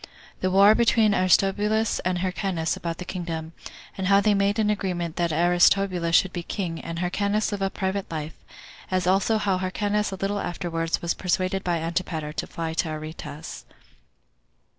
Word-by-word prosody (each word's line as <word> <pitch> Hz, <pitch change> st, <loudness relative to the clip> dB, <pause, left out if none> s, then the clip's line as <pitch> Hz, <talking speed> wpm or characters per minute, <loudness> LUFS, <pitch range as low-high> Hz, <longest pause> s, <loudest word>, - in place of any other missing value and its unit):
The 185 Hz, -, 0 dB
War 200 Hz, +3 st, +7 dB
Between 225 Hz, -2 st, +3 dB
Aristobulus 205 Hz, +4 st, +2 dB
And 185 Hz, 0 st, -1 dB
Hyrcanus 185 Hz, -2 st, -1 dB
About 165 Hz, -1 st, -4 dB
The 180 Hz, -, -7 dB
Kingdom; 165 Hz, -3 st, -5 dB, 0.4 s
And 190 Hz, -1 st, -2 dB
How 200 Hz, 0 st, +6 dB
They 210 Hz, +1 st, +3 dB
Made 200 Hz, +1 st, +1 dB
Anagreement 185 Hz, -6 st, -1 dB
That 170 Hz, -1 st, +1 dB
Aristobulus 175 Hz, +1 st, +3 dB
Should 190 Hz, +2 st, +3 dB
Be 175 Hz, -, -3 dB
King, 170 Hz, -2 st, -4 dB
And 165 Hz, 0 st, -6 dB
Hyrcanus 200 Hz, +5 st, 0 dB
Live 205 Hz, -1 st, -3 dB
A 195 Hz, -, +1 dB
Private 190 Hz, 0 st, -3 dB
Life; 155 Hz, -1 st, -5 dB, 0.6 s
As 185 Hz, -1 st, 0 dB
Also 195 Hz, +4 st, +3 dB
How 200 Hz, -3 st, 0 dB
Hyrcanus 205 Hz, +3 st, -1 dB
A -, -, -3 dB
Little 195 Hz, +2 st, -2 dB
Afterward 165 Hz, -2 st, -2 dB
Was 170 Hz, -, +1 dB
Persuaded 185 Hz, +1 st, -1 dB
By 175 Hz, -2 st, 0 dB
Antipater 165 Hz, -2 st, -3 dB
To -, -, -4 dB
Fly 165 Hz, -1 st, -4 dB
To 160 Hz, 0 st, -1 dB
Aretas. 155 Hz, 0 st, -7 dB
185 Hz, 160 wpm, -25 LUFS, 170-200 Hz, 0.6 s, War